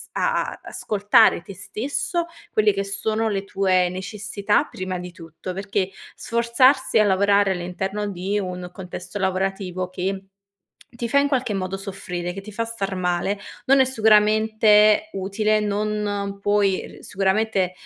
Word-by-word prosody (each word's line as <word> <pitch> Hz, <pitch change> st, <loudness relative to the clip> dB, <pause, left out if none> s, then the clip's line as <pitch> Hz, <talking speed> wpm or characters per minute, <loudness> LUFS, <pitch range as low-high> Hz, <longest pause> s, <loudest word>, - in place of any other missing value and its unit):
a -, -, -1 dB
ascoltare 210 Hz, 0 st, +3 dB
te 195 Hz, -, -11 dB
stesso, 255 Hz, -, -2 dB, 0.3 s
quelle 210 Hz, -2 st, +3 dB
che 195 Hz, 0 st, -1 dB
sono 220 Hz, +2 st, -1 dB
le 195 Hz, -1 st, -2 dB
tue 185 Hz, -2 st, +2 dB
necessità 200 Hz, +2 st, -1 dB
prima 185 Hz, -1 st, -4 dB
di 180 Hz, 0 st, -7 dB
tutto, 170 Hz, +1 st, -9 dB
perché 195 Hz, -1 st, -2 dB, 0.2 s
sforzarsi 235 Hz, +2 st, +2 dB
a 215 Hz, -, +5 dB
lavorare 200 Hz, 0 st, +3 dB
all'interno 190 Hz, +3 st, -3 dB
di 195 Hz, +2 st, -2 dB
un 180 Hz, -2 st, -4 dB
contesto 185 Hz, +1 st, -7 dB
lavorativo, 190 Hz, -1 st, -2 dB
che 190 Hz, +1 st, -3 dB, 0.7 s
ti 235 Hz, 0 st, -4 dB
fa 280 Hz, -, +3 dB
in 285 Hz, -, +1 dB
qualche 250 Hz, -6 st, 0 dB
modo 190 Hz, 0 st, -3 dB
soffrire, 180 Hz, -3 st, -5 dB
che 195 Hz, -, -7 dB
ti 210 Hz, +1 st, -10 dB
fa 230 Hz, +3 st, -2 dB
star 200 Hz, -4 st, -3 dB
male, 180 Hz, +3 st, -1 dB, 0.3 s
non 270 Hz, +1 st, +5 dB
è -, -, +7 dB
sicuramente 215 Hz, -2 st, +4 dB
utile, 205 Hz, +3 st, 0 dB
non 205 Hz, -1 st, -2 dB
puoi 200 Hz, -1 st, 0 dB
sicuramente, 195 Hz, -1 st, 0 dB
200 Hz, 140 wpm, -23 LUFS, 190-215 Hz, 0.7 s, è